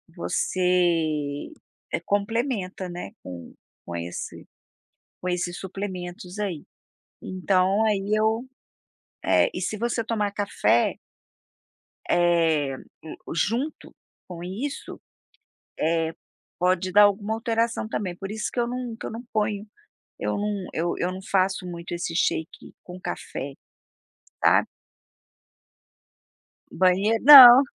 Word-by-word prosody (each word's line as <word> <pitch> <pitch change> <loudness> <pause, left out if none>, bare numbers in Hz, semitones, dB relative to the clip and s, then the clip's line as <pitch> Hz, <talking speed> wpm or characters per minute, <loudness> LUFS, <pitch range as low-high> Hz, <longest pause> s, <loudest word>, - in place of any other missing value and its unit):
você 165 -6 0 0.5
complementa, 205 -2 -1
né, 175 - -7
com 90 -2 -9 0.3
com 85 - -6
esse 85 +1 -6 0.8
com 180 - -4
esses 175 0 -2
suplementos 185 -1 -6
aí. 185 -8 -3 0.6
Então 185 +2 +1
aí 205 -1 0
eu, 220 +2 +1 0.8
eh, - - +3
e 180 - -3
se 190 +4 -2
você 235 0 -1
tomar 210 -3 -1
café 205 0 +1 1.1
eh, 165 -5 +2 0.6
junto 235 - -2 0.3
com 175 -2 -8
isso, 220 +11 -5 0.8
eh, 160 0 +1 0.5
pode 185 +1 +1
dar 210 +2 +7
alguma 205 +1 +2
alteração 230 0 -1
também, 195 -5 -3
por 195 +3 -7
isso 215 0 -3
que - - -3
eu 235 - +1
não 245 -1 -4
que - - -9
eu - - -5
não 230 +2 -7
ponho 210 -1 -1 0.5
eu - - -2
não 205 -2 -2
eu 170 +2 -1
eu 180 +1 -1
não 185 - -7
faço 190 -1 0
muito 170 -1 -7
esse 170 -1 -3
shake 160 -1 -2
com 180 0 -10
café, 140 -5 -5 0.9
sabe? - - +5 2.0
Banheiro 195 +5 +2
não. 260 -2 +12
190 Hz, 110 wpm, -25 LUFS, 175-215 Hz, 2.0 s, não